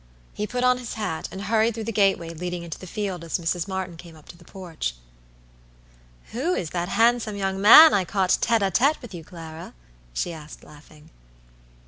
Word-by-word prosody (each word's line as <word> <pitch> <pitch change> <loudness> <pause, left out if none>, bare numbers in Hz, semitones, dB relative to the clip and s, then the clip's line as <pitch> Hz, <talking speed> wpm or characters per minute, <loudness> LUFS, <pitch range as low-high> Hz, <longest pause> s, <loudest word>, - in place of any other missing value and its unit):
He 210 - -4
put 250 +2 -3
on 250 0 +3
his 245 -2 -7
hat, 195 -8 -4
and 190 +1 -7
hurried 220 +1 +1
through 225 - -5
the 230 - -3
gateway 195 -5 +1
leading 175 +1 -5
into 165 -2 -8
the 185 - -10
field 190 -3 -4
as 165 - -2
Mrs. 170 +1 -2
Martyn 190 -3 -5
came 170 -1 -13
up 155 - -18
to - - -11
the 170 - -18
porch. 165 - -6 1.4
"Who 305 +10 -1
is 165 - -4
that 175 0 -3
handsome 225 -1 +2
young 195 -1 -2
man 305 +10 +10
I 195 - +2
caught 185 0 +1
tête 225 -3 +2
a 190 - -1
tête 280 +9 +2
with 240 -5 -11
you, 170 -2 -8
Clara?" 160 - -10 0.4
she 170 - -3
asked, 155 -1 -11
laughing. 150 +1 -17
190 Hz, 195 wpm, -24 LUFS, 170-220 Hz, 1.4 s, man